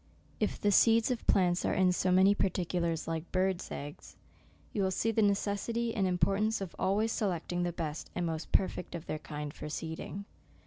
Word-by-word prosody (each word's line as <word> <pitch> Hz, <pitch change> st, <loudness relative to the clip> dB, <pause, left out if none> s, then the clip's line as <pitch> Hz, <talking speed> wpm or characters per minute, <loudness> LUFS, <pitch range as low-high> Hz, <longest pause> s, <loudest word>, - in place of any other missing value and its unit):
If -, -, -1 dB
the 205 Hz, -, +2 dB
seeds 225 Hz, +4 st, +5 dB
of 245 Hz, -, -4 dB
plants 180 Hz, -2 st, +3 dB
are -, -, +1 dB
in 185 Hz, -1 st, +4 dB
so 185 Hz, +1 st, +1 dB
many 190 Hz, +2 st, +6 dB
par 200 Hz, -, +1 dB
ticulars 170 Hz, -3 st, -1 dB
like 165 Hz, 0 st, -4 dB
bird's 185 Hz, -1 st, 0 dB
eggs, 145 Hz, +1 st, -8 dB, 0.6 s
you 205 Hz, -, 0 dB
will 190 Hz, -, +2 dB
see 220 Hz, +4 st, 0 dB
the 220 Hz, -, +1 dB
ne 200 Hz, -1 st, +4 dB
cessity 225 Hz, +4 st, -2 dB
and 195 Hz, -3 st, +2 dB
importance 200 Hz, +4 st, +1 dB
of 195 Hz, -3 st, -6 dB
always 205 Hz, +4 st, +1 dB
selecting 175 Hz, -4 st, -1 dB
the 175 Hz, 0 st, 0 dB
best 160 Hz, -2 st, -5 dB
and 180 Hz, -, -1 dB
most 160 Hz, -1 st, -4 dB
perfect 185 Hz, -2 st, 0 dB
of 165 Hz, -, -6 dB
their 155 Hz, -, -3 dB
kind 150 Hz, -1 st, -6 dB
for -, -, -7 dB
seeding. 160 Hz, +6 st, -5 dB
185 Hz, 195 wpm, -31 LUFS, 170-200 Hz, 0.6 s, many